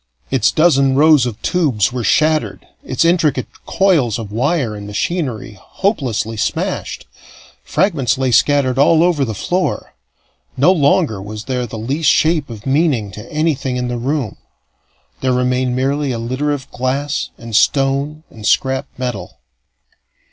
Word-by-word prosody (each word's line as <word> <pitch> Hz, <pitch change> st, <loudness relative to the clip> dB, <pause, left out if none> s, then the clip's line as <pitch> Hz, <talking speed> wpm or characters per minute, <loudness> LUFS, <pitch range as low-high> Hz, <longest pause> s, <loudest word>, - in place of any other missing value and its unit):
Its 130 Hz, -1 st, +2 dB
dozen 140 Hz, -5 st, +3 dB
rows 150 Hz, -3 st, +5 dB
of 115 Hz, -4 st, -6 dB
tubes 140 Hz, -, +1 dB
were 125 Hz, -2 st, -3 dB
shattered, 155 Hz, +8 st, +1 dB, 0.2 s
its 130 Hz, +5 st, 0 dB
intricate 160 Hz, -6 st, +2 dB, 0.2 s
coils 160 Hz, -, +2 dB
of 110 Hz, -3 st, -7 dB
wire 130 Hz, +1 st, 0 dB
and 100 Hz, -1 st, -8 dB
machinery 120 Hz, -, -3 dB
hopelessly 130 Hz, -, -2 dB
smashed. 105 Hz, -, -3 dB, 0.6 s
Fragments 140 Hz, -, 0 dB
lay 130 Hz, -1 st, 0 dB
scattered 135 Hz, +2 st, +3 dB
all 160 Hz, +3 st, +5 dB
over 170 Hz, -5 st, +2 dB
the 110 Hz, -5 st, -3 dB
floor. 180 Hz, -, -2 dB, 0.6 s
No 145 Hz, +8 st, +5 dB
longer 150 Hz, -, +2 dB
was 105 Hz, +2 st, -7 dB
there 125 Hz, 0 st, -2 dB
the 110 Hz, -, -7 dB
least 140 Hz, +8 st, 0 dB
shape 155 Hz, -2 st, +2 dB
of 110 Hz, -3 st, -9 dB
meaning 135 Hz, -, +1 dB
to 105 Hz, +4 st, -11 dB
anything 150 Hz, -5 st, -1 dB
in 125 Hz, 0 st, -2 dB
the 120 Hz, -, -3 dB
room; 130 Hz, -3 st, -2 dB, 0.8 s
there 130 Hz, -1 st, 0 dB
remained 125 Hz, 0 st, 0 dB
merely 135 Hz, +2 st, 0 dB
a 120 Hz, -, -2 dB
litter 130 Hz, +6 st, -2 dB
of 140 Hz, -3 st, -5 dB
glass 135 Hz, +4 st, -2 dB
and 115 Hz, -2 st, -7 dB
stone 140 Hz, +6 st, +1 dB
and 110 Hz, -, -12 dB
scrap 130 Hz, +1 st, +1 dB
metal. 120 Hz, -9 st, -5 dB
130 Hz, 145 wpm, -17 LUFS, 120-150 Hz, 0.8 s, rows